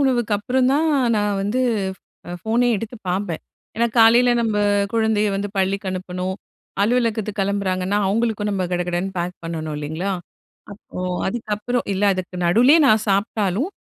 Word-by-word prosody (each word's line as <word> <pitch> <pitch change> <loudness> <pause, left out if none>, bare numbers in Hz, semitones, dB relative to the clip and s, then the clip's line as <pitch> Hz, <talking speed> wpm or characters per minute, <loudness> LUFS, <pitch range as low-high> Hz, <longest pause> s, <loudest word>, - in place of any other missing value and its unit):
உணவுக்கு 245 -5 +1
அப்புறம் 250 +4 +1
தான் 315 +3 +2 0.3
நான் 205 -1 0
வந்து 220 +6 0 0.7
அ - - -6
ஃபோனே 235 +2 +1
எடுத்து 225 +4 -6
பார்ப்பேன். 180 -2 -2 0.4
என்னா 235 - +3
காலைல 235 +2 +6
நம்ப 220 -2 0 0.4
குழந்தைய 220 -2 +2
வந்து 200 +1 -2
பள்ளிக்கு 195 +1 0
அனுப்பணும், 185 0 -4 0.5
அலுவலகத்துக்கு 220 -2 0
கிளம்புறாங்கன்னா 195 0 0
அவங்களுக்கும் 215 0 0
நம்ம 190 -2 -1
கடகடன்னு 180 +2 -1
பேக் 175 +1 -3
பண்ணனும் 160 -2 -4
இல்லிங்களா? 160 +7 -3 0.6
அப்போ 200 - -11 0.3
அதுக்கப்பறம் 220 +3 -2
இல்ல 195 +2 -2
அதுக்கு 185 -1 -6
நடுலயே 245 - +5
நான் 215 -4 +4
சாப்ட்டாலும், 200 - 0
205 Hz, 135 wpm, -21 LUFS, 185-230 Hz, 0.7 s, காலைல